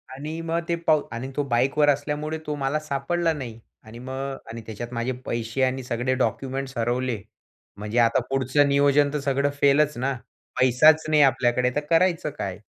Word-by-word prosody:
आणि 155 +4 -6
मग 165 +1 -1
ते 170 - +2
पाउ 155 -2 +5
आणि 125 +3 -5
तो 145 - 0
बाईकवर 135 +4 +2
असल्यामुळे 150 +2 -1
तो 150 - -2
मला 140 +1 -1
सापडला 155 +3 -1
नाही. 120 -6 -7 0.2
आणि 115 +2 -12
मग 135 +1 -5
आणि 115 0 -7
त्याच्यात 120 +3 -7
माझे 115 +2 -2
पैसे 115 +2 -3
आणि 130 0 0
सगळे 125 +1 -1
डॉक्युमेंट्स 135 0 -3
हरवले. 120 -1 -1 0.6
म्हणजे 105 +4 -2
आता 115 -1 +4
पुढचं 135 +2 +2
नियोजन 140 +1 +3
तर 150 - -1
सगळं 140 0 0
फेलच 145 0 +3
ना. 135 +3 -1 0.5
पैसाच 150 +5 +5
नाही 150 -1 +4
आपल्याकडे 125 -2 +2
तर - - +2
करायचं 170 -1 +2
काय? 95 0 -4
135 Hz, 170 wpm, -24 LUFS, 120-150 Hz, 0.6 s, पाउ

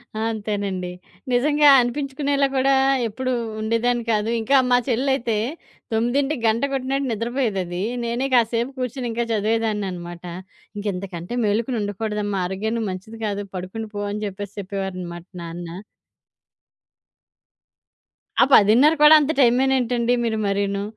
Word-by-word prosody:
ఆ! - - -3
అంతేనండి. 200 -4 -3 0.4
నిజంగా 295 +4 +4
అనిపించుకునేలా 275 +2 0
గూడా 270 +1 +3 0.3
ఎప్పుడు 255 +4 -3 0.3
ఉండేదాన్ని 230 +2 0
కాదు. 215 +1 +1
ఇంకా 275 +5 +3
మా 245 - +6
చెల్లయితే 245 -2 +1 0.6
9కి 265 +5 0
గంట 225 +3 +1
కొట్టినట్టు 270 +1 -1
నిద్రపోయేదది. 215 -6 -2 0.2
నేనే 235 +3 -1
కాసేపు 235 +1 +2
కూర్చొని 255 0 -3
ఇంకా 235 +1 -1
చదివేదాన్ననమాట. 205 -6 -2 0.5
"ఇంక 205 - -6
ఇంతకంటే 180 +1 -6
మేలుకొని 225 +4 0
ఉండకూడదమ్మా, 205 0 -2
ఆరోగ్యానికి 220 +4 -2
మంచిది 205 +5 -8
కాదు, 205 -1 -2
పడుకుండి 190 +5 -5
పో" 205 - -3
అని 210 +1 -4
జెప్పేసి 200 0 -6
చెప్పేవారనమాట 185 -3 -5 0.2
నాన్న. 170 0 -7 2.7
ఆ - - +9
10:30 235 +10 +6
కూడా 300 +1 +9
అంత 295 +1 +1
టైమేనేంటండి 245 -1 +2
మీరు 220 -1 0
మరీను? 200 0 -1
225 Hz, 115 wpm, -22 LUFS, 200-250 Hz, 2.7 s, ఆ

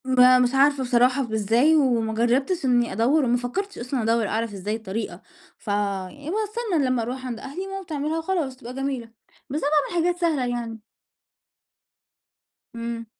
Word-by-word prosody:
ما 255 -1 +6
مش 250 -1 +3
عارفة 275 0 +4
بصراحة 250 +2 +3
ب 230 -3 -6
إزاي 230 +9 +3
وما 240 -7 +2
جرّبتش 260 +8 +1
إنّي 245 -2 +2
أدوّر، 260 +8 +3
وما 245 0 +2
فكّرتش 325 +12 -4
أصلًا 250 +1 -2
أدوّر 225 -1 +2
أعرف 225 +1 -2
إزاي 200 +2 -3
الطريقة، 210 -3 -5 0.4
ف - - -24
يعني 205 - -2
باستنى 425 - -1
لمّا 255 -2 +1
أروح 255 +3 -4
عند 240 -3 -4
أهلي 360 +8 -6
ماما 390 0 -5
بتعملها 310 -1 -2
وخلاص 325 -5 -1
وتبقى 245 -1 -9
جميلة، 265 -3 -3 0.4
بس 295 +4 -2
أنا 290 - +1 0.2
باعمل 340 -1 +1
حاجات 355 0 0
سهلة 310 -7 +1
يعني. 235 -2 -4 1.9
إمم. 230 0 -4
250 Hz, 165 wpm, -24 LUFS, 230-295 Hz, 1.9 s, ما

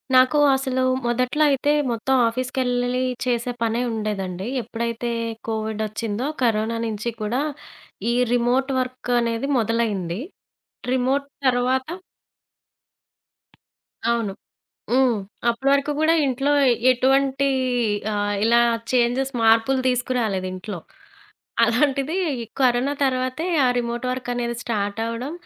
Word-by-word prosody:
నాకు 255 +3 +5 0.2
అసలు 265 -1 0 0.2
మొదట్లో 250 +5 +1
అయితే 280 +1 +2 0.2
మొత్తం 235 +3 0
ఆఫీస్‌కెళ్లలి 250 0 -1 0.2
చేసే 245 0 0
పనే 230 +1 +1
ఉండేదండి. 195 -4 -3 0.2
ఎప్పుడైతే 235 +1 -3 0.4
కోవిడొచ్చిందో, 220 +1 -3 0.2
కరోనా 225 0 +1
నించి 220 +1 -3
కూడా 230 +6 0 0.7
ఈ - - +1 0.2
రిమోట్ 245 +3 +1
వర్కనేది 245 -1 -1
మొదలైంది. 215 -6 -1 0.7
రిమోట్ 260 +2 +1 0.2
తరవాత 255 +1 +1 2.2
అవును. 230 -4 0 0.6
హ్మ్. 255 0 +4 0.3
అప్పుడు 235 +4 0
వరకు 280 +1 +2
గూడా 315 +1 +4
ఇంట్లో 270 +2 0 0.4
ఎటువంటీ 270 +2 +2 0.6
ఆహ్, 205 0 0
ఇలా 235 +1 +5 0.3
చేంజెస్ 255 +2 +1
మార్పులు 225 +4 +4
తీసుకురాలేదింట్లో. 210 -7 -2 0.9
అలాంటిది 275 +6 +1 0.4
కరోనా 255 +2 +3
తర్వాతే, 255 +4 -1 0.2
ఆ - - +4
రిమోట్ 240 +1 -3
వర్కనేది 245 -1 -3
స్టార్టవ్వడం, 230 +4 -3
245 Hz, 90 wpm, -23 LUFS, 225-260 Hz, 2.2 s, నాకు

